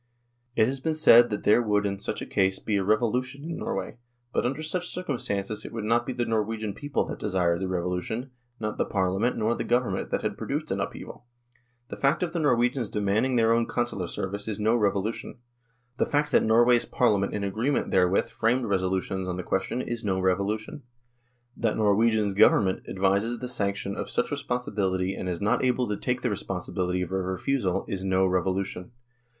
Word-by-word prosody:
It 110 - +5
has 135 +3 -2
been 155 +4 -1
said 120 -6 +7
that 105 - -3
there 105 +3 +5
would 105 -2 +1
in 100 -1 -2
such - - -3
a - - -5
case 95 0 +1
be 105 - -2
a 95 - 0
revolu 110 +4 +2
tion 140 +3 -11
in 165 +1 -5
Norway; - - -4 0.4
but - - +1
under 140 +5 -3
such 180 +3 -1
circumstances 110 - -2
it - - -8
would 115 -2 -5
not 115 +2 +1
be 130 - -2
the 120 -1 -1
Norwegian 110 -1 -1
people 145 +6 -2
that - - -6
desired 90 -4 0
the 95 - -1
revolution, 90 +8 -3 0.3
not 105 -1 -4
the - - +2
Parliament 95 +5 0
nor 110 +1 +1
the - - -3
Government 120 -6 0
that - - -1
had - - -3
produced - - -3
an - - -1
upheaval. 120 - -7 0.6
The - - -6
fact 140 +6 +2
of 170 - -2
the 170 - -2
Norwegians 125 -4 +1
demanding 105 +5 +1
their 115 -1 +4
own 115 0 +1
Consular 120 -7 -2
service 100 +4 -4
is 110 -1 -3
no 110 +2 +3
revolution; 105 0 -1 0.6
the - - +1
fact 150 0 0
that - - +5
Norway's 120 +2 +4
Parliament 105 -5 +1
in 105 - -2
agreement 110 +8 -1
therewith 90 0 +3
framed 120 +2 +1
resolutions 95 -1 -1
on 90 -1 -3
the 90 - -4
question 95 +8 -1
is 120 0 -4
no 95 -2 0
revolution; 100 +7 -1 0.7
that 115 -2 0
Norway's 110 0 +3
Government 95 -1 +3
advises 100 +5 +1
the 125 - -5
sanction 100 -4 -1
of - - -4
such - - 0
resolutions 100 -9 -1
and 90 - -3
is 85 -2 -3
not 105 +5 +1
able 125 -1 +1
to 105 - -1
take 125 +4 -2
the 125 - +1
responsibility 90 -2 -2
of 90 - -7
a 95 0 0
refusal 95 +1 -1
is 95 -1 -4
no 95 0 +2
revolution. 95 +3 -1
105 Hz, 195 wpm, -26 LUFS, 95-120 Hz, 0.7 s, said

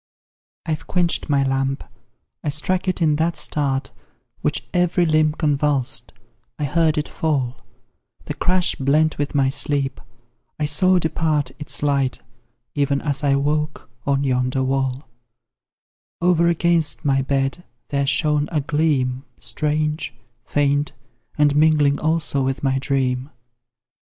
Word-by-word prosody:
I've 155 -2 -3
quench'd 175 -3 0
my 140 -1 +3
lamp, 135 0 -1 0.6
I 150 - -1
struck 180 +6 -1
it 185 -2 0
in 150 -2 +3
that 165 +2 0
start 140 -2 0 0.5
Which 150 0 -1
every 180 0 +2
limb 155 -1 +3
convulsed, 140 -6 0 0.5
I 150 - -3
heard 160 +2 +2
it 150 - -1
fall 135 -5 -2 0.6
The - - -3
crash 180 0 +1
blent 150 +4 +1
with 145 0 -2
my 135 -2 +3
sleep, 140 0 0 0.6
I 150 - 0
saw 185 +6 +3
depart 155 -5 0
Its 145 0 -2
light, 140 -3 +1 0.6
even 140 -1 +1
as 145 -2 -1
I 140 -1 +3
woke, 150 0 -1 0.2
on 140 0 +2
yonder 130 0 0
wall; 130 +1 -1 1.1
Over 170 -1 +3
against 170 -2 +1
my 135 -1 +3
bed, 135 +4 -1 0.3
there 140 -1 0
shone 150 +1 +3
a 155 - +1
gleam 140 -4 0
Strange, 150 -2 -2 0.3
faint, 145 +1 0 0.4
and 145 -1 +3
mingling 150 -2 +4
also 155 -3 0
with 135 +1 -2
my 135 -1 +1
dream. 130 -1 -1
145 Hz, 130 wpm, -21 LUFS, 135-155 Hz, 1.1 s, mingling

